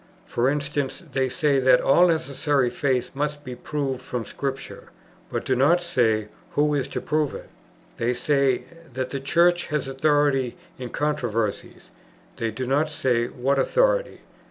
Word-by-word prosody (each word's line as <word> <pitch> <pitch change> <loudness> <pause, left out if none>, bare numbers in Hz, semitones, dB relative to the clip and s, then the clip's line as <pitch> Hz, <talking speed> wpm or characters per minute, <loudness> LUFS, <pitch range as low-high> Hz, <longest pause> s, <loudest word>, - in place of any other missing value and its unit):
For 120 +2 +1
instance, 145 +2 -2
they 130 -1 0
say 140 +2 +2
that 130 -1 +5
all 175 +6 +5
necessary 145 -5 +1
faith 130 -4 0
must 145 +1 -3
be 130 - -6
proved 135 0 -3
from 125 -2 -4
Scripture; 135 -1 -5 0.4
but - - -3
do 130 - +1
not 145 +8 +4
say 110 -11 +1 0.2
who 150 0 +2
is 140 -3 0
to - - -4
prove 150 -2 0
it. - - -9 0.5
They 120 +2 0
say, 140 -1 +1 0.3
that 130 -1 -3
the 140 - -3
Church 170 +5 +3
has 150 -4 -2
authority 135 -2 +1 0.2
in 125 -1 -5
controversies; 115 -7 -2 0.5
they 115 - -1
do 125 +4 -4
not 145 +4 +1
say 125 -5 0
what 135 +3 0
authority. - - +1
135 Hz, 155 wpm, -24 LUFS, 125-150 Hz, 0.5 s, that